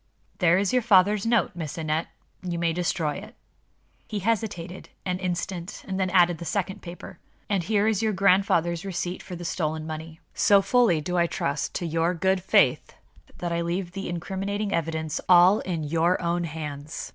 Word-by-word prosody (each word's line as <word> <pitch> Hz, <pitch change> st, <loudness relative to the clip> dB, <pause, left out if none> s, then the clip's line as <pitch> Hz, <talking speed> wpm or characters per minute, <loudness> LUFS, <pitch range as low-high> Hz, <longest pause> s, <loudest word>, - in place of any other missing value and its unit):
"There 175 Hz, -2 st, +4 dB
is 200 Hz, +4 st, 0 dB
your 250 Hz, -, +4 dB
father's 205 Hz, -1 st, +4 dB
note, 230 Hz, -4 st, +2 dB
Miss 160 Hz, -3 st, -6 dB
Aneth. 155 Hz, 0 st, -1 dB, 0.3 s
You 175 Hz, -2 st, -3 dB
may 170 Hz, -1 st, +1 dB
destroy 165 Hz, -3 st, -1 dB
it." 215 Hz, +5 st, -10 dB, 0.7 s
He 215 Hz, -, -4 dB
hesitated 195 Hz, -4 st, -2 dB, 0.2 s
an 180 Hz, -1 st, -1 dB
instant, 180 Hz, 0 st, -4 dB
and 190 Hz, -1 st, -3 dB
then 185 Hz, -1 st, +1 dB
added 175 Hz, -2 st, +4 dB
the -, -, -6 dB
second 190 Hz, +3 st, -2 dB
paper. 175 Hz, 0 st, -10 dB, 0.3 s
"And 195 Hz, -3 st, +2 dB
here 205 Hz, +4 st, +1 dB
is 220 Hz, -2 st, +1 dB
your 220 Hz, -1 st, +1 dB
grandfather's 185 Hz, -3 st, +2 dB
receipt 180 Hz, -1 st, -4 dB
for 180 Hz, -, -8 dB
the 175 Hz, 0 st, -7 dB
stolen 155 Hz, -2 st, -2 dB
money. 160 Hz, +1 st, -7 dB
So 200 Hz, -1 st, +4 dB
fully 200 Hz, -6 st, +3 dB
do 180 Hz, +3 st, -1 dB
I 170 Hz, -, +3 dB
trust 140 Hz, -3 st, -2 dB
to 175 Hz, -, -2 dB
your 165 Hz, +2 st, 0 dB
good 190 Hz, +2 st, +1 dB
faith 190 Hz, -, +2 dB, 0.4 s
that 175 Hz, -1 st, -3 dB
I 170 Hz, 0 st, 0 dB
leave 175 Hz, +1 st, -2 dB
the 195 Hz, 0 st, -5 dB
incriminating 195 Hz, +4 st, -3 dB
evidence 160 Hz, -1 st, -2 dB
all 180 Hz, +3 st, +7 dB
in 170 Hz, -4 st, -3 dB
your 165 Hz, +4 st, +1 dB
own 170 Hz, 0 st, -1 dB
hands. 150 Hz, -2 st, -6 dB
175 Hz, 180 wpm, -26 LUFS, 165-195 Hz, 0.7 s, all